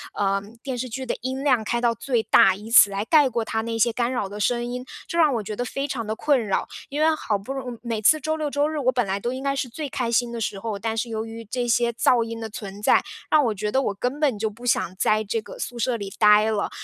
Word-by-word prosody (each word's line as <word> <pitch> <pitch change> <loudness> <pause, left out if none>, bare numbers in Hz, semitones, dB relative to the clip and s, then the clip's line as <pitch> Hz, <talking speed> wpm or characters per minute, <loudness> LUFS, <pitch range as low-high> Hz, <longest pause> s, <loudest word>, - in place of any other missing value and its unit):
呃， 195 -1 +1 0.2
电 265 -2 -3
视 255 +1 -4
剧 260 +3 -5
的 - - -2
音 260 +2 -3
量 255 -6 +3
开 235 +2 -1
到 235 -1 +2
最 235 0 -1
大， 190 -1 +5
以 215 +3 -10
此 205 -3 +8
来 200 +2 -3
盖 295 -3 +5
过 230 -2 -2
它 220 0 -1
那 230 0 -3
些 230 +1 +2
干 240 +1 0
扰 240 -6 -1
的 205 +2 -8
声 240 +3 0
音。 250 +1 -5 0.2
这 - - -5
让 310 -4 +5
我 220 - -2
觉 210 +1 -5
得 245 - -2
非 275 +4 -3
常 235 -5 -4
地 220 - -2
困 275 -2 +2
扰。 195 - 0 0.2
因 290 +2 -4
为 320 0 +4
好 210 -8 -1
不 220 +8 -6
容 255 -3 -5
易 - - -18
每 225 -2 -3
次 310 +8 +5
周 315 +3 -1
六 305 -2 -2
周 285 +1 +1
日 310 -1 -3
我 255 -1 +2
本 245 -3 0
来 195 +1 -2
都 240 +4 -2
应 260 +1 -5
该 275 0 0
是 265 -2 -2
最 295 +4 -5
开 240 -2 -2
心 235 +1 +1
的 230 -1 -5
时 195 -2 -2
候， 210 -2 -4
但 225 +2 -3
是 235 - -1
由 220 0 -3
于 225 0 -8
这 245 +3 -3
些 235 0 +2
噪 235 0 +3
音 230 0 -6
的 220 - -5
存 205 -1 -8
在， - - +4 0.3
让 305 -2 +5
我 220 - +1
觉 210 +1 -3
得 265 - +2
我 205 - -1
根 250 +8 -3
本 265 -9 +1
就 220 0 0
不 235 +4 -12
想 185 -6 +1
在 215 +1 +2
这 220 +2 -2
个 - - -11
宿 245 - -5
舍 235 +1 0
里 200 -2 -6
呆 210 +1 +5
了。 205 -2 -1
235 Hz, 315 characters per minute, -24 LUFS, 215-260 Hz, 0.3 s, 此